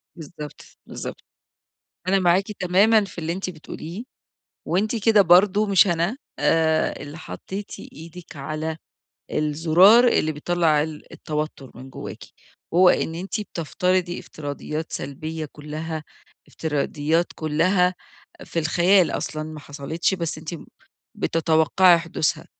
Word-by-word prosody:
بالضبط، 150 -2 -9 0.2
بالضبط. - - -7 0.8
أنا 195 +1 +3
معاكِ 185 +3 +2
تمامًا 200 +4 +4
في 195 - -13
اللي 165 0 -2
أنتِ 185 +1 -4
بتقوليه، 165 +4 -8 0.6
وأنتِ 205 +6 0
كده 215 -1 +6
برضو 195 +3 +5
مش 200 -1 +5
أنا، 175 +7 0 0.2
آآ، 160 -1 +2
اللي 145 +2 -8
حطيتِ 195 +4 -7 0.2
إيدِك 165 +1 -11
على 155 +3 -4 0.5
الزرار 170 +10 +5
اللي 155 -8 +2
بيطلّع 155 0 +1
ال 155 -1 -8
التوتر 150 -4 -5
من 130 +3 -11
جواكِ، - - -8 0.5
هو 180 +1 +7
إن 165 - +1
أنتِ 185 +5 -4
بتفترضي 180 -1 -1
افتراضيات 150 +1 -6
سلبية 155 +3 -5
كلها، 155 +1 -6 0.4
افتراضيات 155 +2 0
كلها 180 +4 +2 0.5
في - - -4
الخيال 175 +3 +4
أصلًا 155 - -3
ما 155 0 -8
حصلتش، 145 +6 -2
بس 170 -4 -3
أنتِ 155 +2 -6 0.6
بتتوقعي 165 +2 +4
حدوثها. 170 -2 -2
165 Hz, 115 wpm, -23 LUFS, 155-185 Hz, 0.8 s, هو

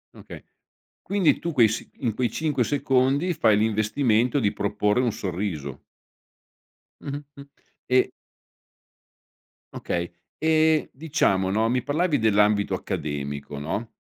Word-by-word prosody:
Okay. - - -11 0.6
Quindi 195 -5 +2
tu 170 - -3
quei 115 -5 +5
s 110 - -2 0.3
in 110 - +1
quei 120 0 0
5 145 -2 0
secondi 140 +5 +1
fai 110 -8 +3
l'investimento 110 +4 +1
di 105 -4 +1
proporre 105 +3 0
un 120 -3 +1
sorriso. 85 -8 -4 1.2
Mh-mh, 145 +1 -6
mh, 140 0 -11 0.4
e 130 0 +3 1.6
Okay, 85 0 -3 0.3
ehm, 160 -1 +2
diciamo 130 - 0
no, 110 +3 +1
mi 125 0 +1
parlavi 150 0 +1
dell'ambito 105 -1 +2
accademico, 70 -1 -5
no, 90 +10 -4
115 Hz, 115 wpm, -24 LUFS, 100-145 Hz, 1.6 s, quei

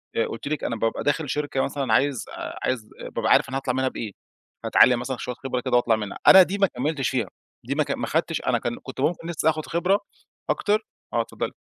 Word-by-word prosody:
آآ، 115 - +2
قُلت 115 - -6
لِك 150 0 -2
أنا 115 - -1
بابقى 115 0 -1
داخل 145 0 0
شركة 145 -1 -1
مثلًا 135 -4 -1
عايز 135 +1 +2
آآ، - - -7
عايز 120 -4 -2 0.2
بابقى - - -1
عارف - - +5
أنا 135 - -2
هاطلّع 135 -2 -1
منها 130 +1 +1
بإيه، 110 -4 -5 0.5
هاتعلّم 125 -1 +5
مثلًا 125 +1 -3
شوية 125 - -5
خبرة 125 -1 -3
كده 125 - 0
وأطلع 120 -2 +3
منها. 105 -2 -5
أنا 190 - +11
دي 190 +3 -3
ما 195 -1 +4
كملتش 140 0 -1
فيها، 125 -6 -1 0.4
دي - - -2
ما - - +2
ك - - -5
ما - - -2
خدتش - - 0
أنا - - +3
كان 120 - -3
كنت 130 0 -7
ممكن 165 +3 0
لسّة 160 -1 +1
آخد 155 -1 -2
خبرة 180 +4 +2 0.5
أكتر 210 +1 0 0.3
آه، - - +3
اتفضلي. - - -4
135 Hz, 225 wpm, -24 LUFS, 120-155 Hz, 0.5 s, أنا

